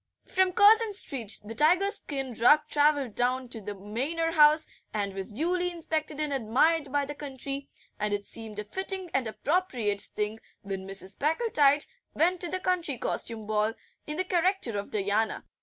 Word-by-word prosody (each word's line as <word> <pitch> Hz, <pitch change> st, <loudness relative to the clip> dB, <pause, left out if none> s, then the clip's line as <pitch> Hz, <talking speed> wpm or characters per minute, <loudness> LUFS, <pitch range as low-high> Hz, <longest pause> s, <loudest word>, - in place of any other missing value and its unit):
From 375 Hz, 0 st, +2 dB
Curzon 425 Hz, +2 st, +5 dB
Street 235 Hz, -, 0 dB
the 220 Hz, -, -6 dB
tiger 350 Hz, -, +3 dB
skin 270 Hz, -, -1 dB
rug 245 Hz, +7 st, +5 dB
travelled 290 Hz, -6 st, +2 dB
down 250 Hz, +2 st, 0 dB
to 230 Hz, -2 st, -5 dB
the 205 Hz, +1 st, -6 dB
Manor 265 Hz, -, -2 dB
House, 305 Hz, 0 st, +5 dB, 0.3 s
and 200 Hz, -2 st, -2 dB
was 195 Hz, +2 st, -3 dB
duly 350 Hz, -, 0 dB
inspected 315 Hz, -3 st, -3 dB
and 300 Hz, -2 st, -1 dB
admired 275 Hz, +5 st, +1 dB
by 285 Hz, 0 st, +1 dB
the 290 Hz, -, -6 dB
county, 275 Hz, -1 st, -5 dB, 0.3 s
and 210 Hz, 0 st, -1 dB
it 205 Hz, 0 st, -2 dB
seemed 220 Hz, -2 st, -6 dB
a 210 Hz, -, -2 dB
fitting 380 Hz, -, -3 dB
and 260 Hz, -3 st, +1 dB
appropriate 240 Hz, -, 0 dB
thing 210 Hz, +1 st, -1 dB, 0.2 s
when 195 Hz, -1 st, -5 dB
Mrs. 195 Hz, 0 st, -1 dB
Packletide 300 Hz, -3 st, +3 dB, 0.3 s
went 350 Hz, +3 st, +2 dB
to 350 Hz, -, -1 dB
the 370 Hz, -, -2 dB
County 360 Hz, -7 st, -1 dB
Costume 225 Hz, -1 st, -3 dB
Ball 215 Hz, +1 st, 0 dB, 0.3 s
in 300 Hz, +1 st, -4 dB
the 370 Hz, -, +1 dB
character 360 Hz, -, 0 dB
of 200 Hz, -, -7 dB
Diana. 210 Hz, +2 st, 0 dB
280 Hz, 170 wpm, -28 LUFS, 220-330 Hz, 0.3 s, Curzon